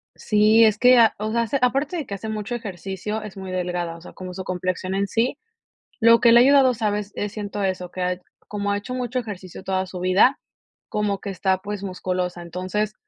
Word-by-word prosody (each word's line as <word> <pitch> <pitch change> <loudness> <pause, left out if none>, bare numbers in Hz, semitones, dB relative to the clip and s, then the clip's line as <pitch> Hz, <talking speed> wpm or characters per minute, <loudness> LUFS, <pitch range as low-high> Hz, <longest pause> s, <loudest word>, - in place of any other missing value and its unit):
Sí, 215 +1 +4
es 215 -1 +3
que 250 +1 +6
a 225 -2 +5
o 215 +1 -3
sea, 275 - 0
aparte 275 +7 +1
de 315 - -3
que 200 - -5
hace 210 +3 -6
mucho 215 +2 -4
ejercicio, 200 0 -5
es 210 -2 -9
muy 190 -1 -6
delgada. 175 -2 -2
O - - -14
sea, - - -11
como 185 -1 -8
su 190 0 -6
complexión 185 +1 -3
en 200 +1 +1
sí. 245 +5 0 0.6
Lo 230 0 +7
que 235 -1 +6
le 235 - +8
ha - - +8
ayudado, 265 -1 +5
¿sabes? 210 -2 -2
Eh, 205 - -2
siento 205 -1 -5
eso, 185 -2 -2
que 185 - -5
ha 180 0 -1 0.3
como 205 -1 -2
ha - - +1
hecho 205 +5 -5
mucho 250 0 -2
ejercicio 190 -5 -8
toda 190 0 -1
su 180 -1 -8
vida, 190 +9 +4 0.5
como 205 -2 -1
que 200 - -5
está, 190 0 0
pues, 205 +1 -6
musculosa. 180 -1 -3
Entonces, 185 +5 -3
205 Hz, 215 wpm, -23 LUFS, 185-225 Hz, 0.6 s, le